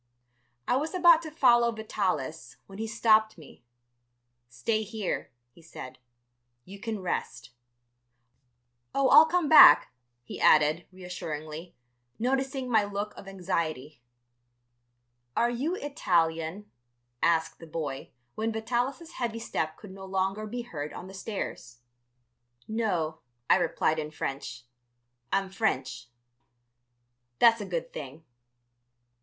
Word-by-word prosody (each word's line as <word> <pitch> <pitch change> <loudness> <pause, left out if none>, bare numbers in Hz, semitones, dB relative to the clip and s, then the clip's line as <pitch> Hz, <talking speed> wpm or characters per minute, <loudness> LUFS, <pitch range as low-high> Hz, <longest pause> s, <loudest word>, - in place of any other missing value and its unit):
I 250 - +3
was 310 +6 -3
about 345 -2 +6
to 320 - -7
follow 240 -6 +4
Vitalis, 190 - -3
when 195 +1 -12
he 225 - -3
stopped 220 -2 +3
me. 150 -6 -15 0.9
"Stay 125 - -1
here," 215 -2 -4 0.2
he 170 - -19
said; 130 -6 -10 0.7
"you 200 +2 -11
can 220 -2 -4
rest. 120 -8 -4 1.4
"Oh, 275 -1 +3
I'll 320 - +9
come 345 -1 +1
back," 310 - +8 0.3
he - - -8
added, 155 +3 +4
reassuringly, 165 -3 -7 0.4
noticing 265 +2 -1
my 220 -4 +3
look 205 +1 -4
of 195 - -12
anxiety. 160 -8 -3 1.4
"Are 240 +1 +3
you 280 +9 -2
Italian?" 175 - -1 0.5
asked 165 -1 +1
the 165 - -11
boy, 150 -4 -5 0.2
when 225 +1 -2
Vitalis' 245 +8 -2
heavy 235 -2 -3
step 160 -8 -3
could 205 - -12
no 190 0 -10
longer 195 +2 -2
be 240 +3 -5
heard 150 -9 -6
on - - -8
the 190 - -11
stairs. 190 - -6 0.9
"No," 180 -8 -1 0.3
I - - +7
replied 160 -2 0
in 150 -1 -4
French, 135 -4 -5 0.7
"I'm 195 0 0
French." 130 - -2 1.3
"That's 230 -1 +5
a - - -4
good 170 -2 -4
thing." 145 +2 -8
195 Hz, 120 wpm, -28 LUFS, 160-230 Hz, 1.4 s, I'll